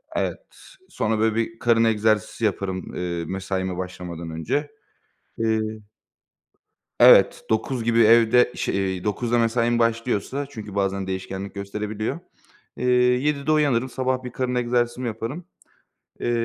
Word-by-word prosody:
Evet, - - -1 0.5
sonra, 110 0 -1
böyle, 110 0 +2
bir 115 0 -2
karın 115 -1 +3
egzersizi 110 0 +1
yaparım, 95 -2 -3
eee, 85 -2 -3
mesaime 95 0 -3
başlamadan 90 -2 -6
önce, 80 - -2 0.7
eee 110 -1 +1 1.4
Evet, - - +7
09.00 115 +2 -1
gibi 115 0 +2
evde 115 +2 +5
ş - - -2
eee, 95 -2 -1
09.00'da 115 +3 0
mesaim 115 +1 +1
başlıyorsa, 115 +3 0
çünkü 105 -5 -9
bazen 95 -1 -1
değişkenlik 95 +1 -5
gösterebiliyor, 105 +2 -4 0.6
eee, 125 - -3
07.00'de 140 +4 +2
uyanırım. 140 -5 +2
Sabah 130 0 -1
bir 125 - -6
karın 125 0 -2
egzersizimi 120 0 0
yaparım. 120 +9 -5 0.8
Eee, - - -1
115 Hz, 125 wpm, -23 LUFS, 100-125 Hz, 1.4 s, Evet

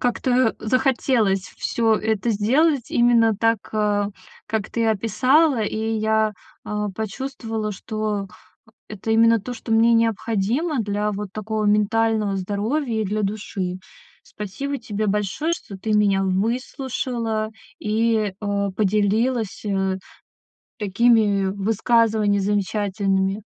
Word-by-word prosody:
как-то 245 -1 +1
захотелось 220 -5 +1
всё 225 -1 +1
это 220 +1 0
сделать 260 +7 +2
именно 235 -2 +4
так, 225 0 +2 0.2
а, 205 -1 +1 0.4
как 215 -2 -2
ты 230 -1 0
описала. 255 +6 +3
И 210 - -2 0.2
я, 220 0 +1 0.3
а, 210 0 -2
почувствовала, 220 +1 -4
что 210 0 -3 0.6
это 215 +1 -5
именно 230 0 +5
то, 245 +4 -6
что 225 -1 -5
мне 230 +1 +5
необходимо 230 - 0
для 210 0 -1
вот 200 -1 -5
такого 215 0 -3
ментального 210 0 +2
здоровья 220 +6 -1
и 215 - 0
для 210 +2 -1
души. 195 -3 -3 0.4
Спасибо 275 +8 -5
тебе 215 -4 -3
большое, 210 - -1
что 195 - -10
ты 215 +2 -2
меня 200 -2 +3
выслушала 230 +2 -2 0.3
и, 215 -2 0
а, 200 -1 -1
поделилась, 215 +3 0
э, 195 -2 0 0.8
такими 210 -1 +3
высказываний 215 0 +2
замечательными. 200 0 0
215 Hz, 110 wpm, -22 LUFS, 205-230 Hz, 0.8 s, именно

